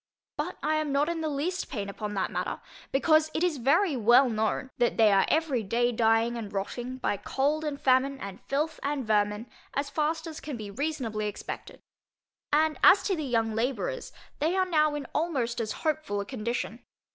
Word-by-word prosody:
But - - -3
I 310 0 +2
am 310 -2 -1
not 285 +3 +2
in 335 -1 -2
the 315 - -1
least 315 +6 -2
pain 205 -7 -4
upon 210 +1 -5
that 190 - -1
matter, - - -3 0.3
because 310 +3 +4
it 315 - +1
is 350 -5 +1
very 295 +7 +3
well 240 +2 +5
known, 220 +4 -1
that 240 - +2
they 220 -2 +6
are 195 -1 +4
every 310 -6 +1
day 235 +4 +1
dying, 225 0 +2
and 215 -3 -6
rotting, 240 +6 -4
by 205 - -1
cold 290 +8 0
and 295 -2 -3
famine, 265 +1 +2
and 195 -4 -7
filth, 300 +4 -1
and 280 -2 -2
vermin, 210 0 +1 0.3
as 280 0 -1
fast 320 +2 0
as 320 -2 -7
can 290 -5 -6
be 210 -2 -7
reasonably 240 -5 -2
expected. 205 - -7 0.7
And 310 +1 +2
as 395 - +8
to 390 - +1
the 310 - -3
young 225 -4 0
labourers, 270 - -2 0.3
they 320 +5 +1
are 375 -1 +3
now 305 -4 +2
in 290 -2 -4
almost 260 -8 -1
as 215 -1 -2
hopeful 310 -10 0
a 200 - -3
condition. 235 0 -4
270 Hz, 190 wpm, -28 LUFS, 225-310 Hz, 0.7 s, as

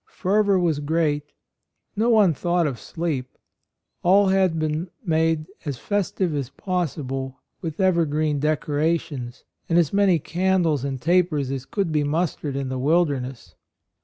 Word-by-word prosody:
Fervor 200 +1 +2
was 165 -5 +1
great: 150 -1 0 0.6
no 225 +3 +2
one 210 -7 +5
thought 175 +3 0
of 135 -6 -2
sleep; 140 +1 -4 0.6
all 195 +2 +5
had 190 -3 +2
been 155 +3 -2 0.2
made 160 -2 +1 0.2
as 145 -5 -4
festive 190 - -1
as 140 -4 -2
possible 135 -8 -3 0.2
with 160 -1 -5
evergreen 155 -5 +2
decora 155 +2 +1
tions 125 -6 -8 0.3
and 165 - +3
as 170 -2 +2
many 200 -3 +4
candles 170 -3 +1
and 135 -2 -3
tapers 165 -3 +1
as 135 -1 -4
could 195 -5 -1
be 150 -1 +1
mustered 150 -2 -1
in 135 -1 -2
the 130 0 -3
wilderness. 135 - 0
160 Hz, 140 wpm, -23 LUFS, 140-180 Hz, 0.6 s, one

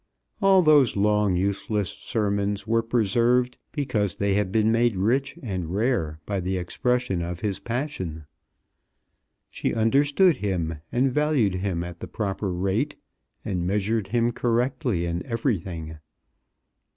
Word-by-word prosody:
All 195 -2 +5
those 150 -6 +5
long 105 -1 +2
useless 100 +1 -1
sermons 100 -2 -2
were 115 +1 +2
preserved 120 +2 +1
because 115 - -1
they 100 0 0
had 100 -1 0
been 110 +1 +3
made 115 -1 +2
rich 125 +9 0
and 95 -7 -3
rare 95 -8 0
by 100 -2 -2
the 95 +1 -2
expression 110 +2 0
of 85 +1 -5
his 105 -3 -2
passion. 115 - -4 1.3
She - - -2
understood 140 - +3
him, 85 -7 -2
and 130 +1 +1
valued 150 -9 +2
him 95 -2 -2
at 85 -1 -8
the - - -6
proper 100 -2 -3
rate, 95 +11 -1 0.5
and 90 -3 -2
measured 105 +1 0
him 120 +2 +1
correctly 120 -5 0
in 85 +1 -2
everything. 90 - -3
105 Hz, 130 wpm, -25 LUFS, 95-125 Hz, 1.3 s, All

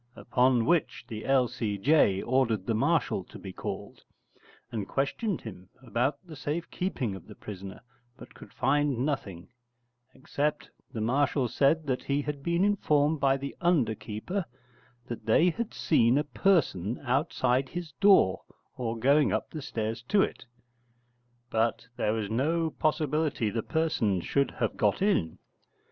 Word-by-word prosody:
Upon 125 -2 +2
which 170 +2 +1
the 110 -2 -6
L.C.J. 120 -3 +2
ordered 120 -6 +1
the 115 - 0
Marshal 140 - +1
to - - -12
be 95 -2 -9
called, - - -6 0.7
and 105 -5 -3
questioned 165 +8 -1
him 95 -4 -10
about 125 +3 -1
the 165 -3 -10
safe 150 +5 -4
keeping 135 - -2
of 95 - -12
the 105 - -11
prisoner, 95 -2 -9 0.4
but - - -13
could - - -14
find 140 -1 +1
nothing: 100 - -4 0.7
except 150 +2 -2 0.2
the 110 - -4
Marshal 130 +3 +1
said 145 +7 +2
that 130 -3 -1
he 140 +1 0
had 145 -1 -4
been 170 +5 +1
informed 155 -7 +2
by 135 -1 +3
the 140 +1 -6
underkeeper 130 - 0 0.6
that 120 -2 -7
they 165 +11 +5
had 230 +5 -4
seen 120 -4 +3
a 150 - +2
person 145 - +1
outside 130 -1 +1
his 175 -3 -6
door 195 - +5 0.3
or 115 -2 -3
going 140 0 +4
up - - -2
the 155 - -6
stairs 115 -2 -3
to 205 -2 +4
it: - - -5 1.1
but 115 +1 0
there 105 - 0
was 110 -2 -2
no 155 +9 0
possibility 150 -5 0
the 115 - -1
person 130 - 0
should 140 +10 0
have 115 - -3
got 105 -1 +2
in. 140 - +1
135 Hz, 145 wpm, -28 LUFS, 110-155 Hz, 1.1 s, they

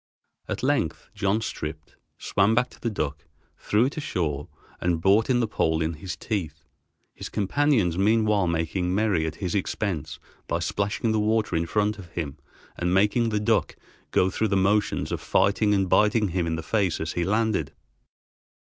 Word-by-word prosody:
At - - -4
length - - 0
John 100 +3 0
stripped, 75 -7 -6 0.2
swam 100 +3 +2
to 125 +1 0
the 115 - 0
duck, 75 -8 -4 0.3
threw 105 +4 +1
it 140 - -3
ashore, 80 - -2 0.3
and 90 -2 0
brought 100 +7 +3
in 125 -1 +3
the 115 - +1
pole 80 -6 0
in 80 +1 -1
his 85 +4 -6
teeth, 80 -9 -4 0.5
his - - -7
companions 105 - +1
meanwhile 105 -2 +3
making 85 +2 -1
merry 100 -7 +1
at 80 - -4
his 90 0 -3
expense 95 -4 -2 0.3
by - - 0
splashing 105 +3 -1
the 110 - +1
water 105 -3 +1
in 85 +1 0
front 105 +1 0
of 90 - -9
him 75 -4 -4 0.4
and 90 +1 +1
making 105 +4 +3
the 105 - 0
dead 105 - -2
duck 110 -2 +1 0.3
go 95 - +2
through 110 - 0
the 100 -1 +1
motions 105 +3 +1
of - - -3
fighting 100 +2 +2
and 95 -2 +2
biting 105 +2 +3
him 85 -1 -1
in 80 - -1
the 80 - -5
face 100 -3 0
as 80 0 -3
he 85 - 0
landed. 105 -6 0
100 Hz, 175 wpm, -25 LUFS, 85-110 Hz, 0.5 s, brought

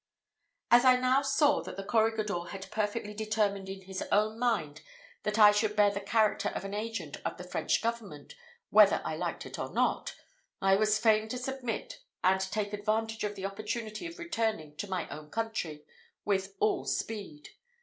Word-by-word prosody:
As 240 +1 +7
I 255 -1 +7
now 255 +2 +3
saw 285 +1 +3
that - - -8
the 195 - -4
corregidor 215 -3 +1
had 190 +2 -8
perfectly 210 0 -2
determined 210 -2 -1
in 190 0 -7
his 190 0 -6
own 215 +2 +2
mind 220 -12 0 0.4
that 210 0 -2
I 210 -1 +9
should 210 0 0
bear 205 -1 +5
the 200 0 -4
character 215 +1 +2
of - - -5
an 195 - -5
agent 225 +2 -4
of - - -3
the - - -7
French - - 0
government, 225 - -4 0.4
whether - - +6
I - - -2
liked - - -3
it - - -8
or - - -4
not, - - 0 0.4
I 195 0 +4
was 215 +1 +3
fain 215 -1 +3
to 250 - -3
submit, 265 - -4 0.2
and 190 +1 +4
take 205 +2 -2
advantage 220 +2 -1
of 205 0 -2
the 195 -1 -5
opportunity 215 - -4
of 335 - -10
returning 225 - -2
to 205 - -5
my 185 -4 -2
own 150 +1 -9
country 205 -9 -3 0.4
with 195 -1 0
all 215 - +2
speed. 195 -10 -4
215 Hz, 180 wpm, -30 LUFS, 195-225 Hz, 0.4 s, I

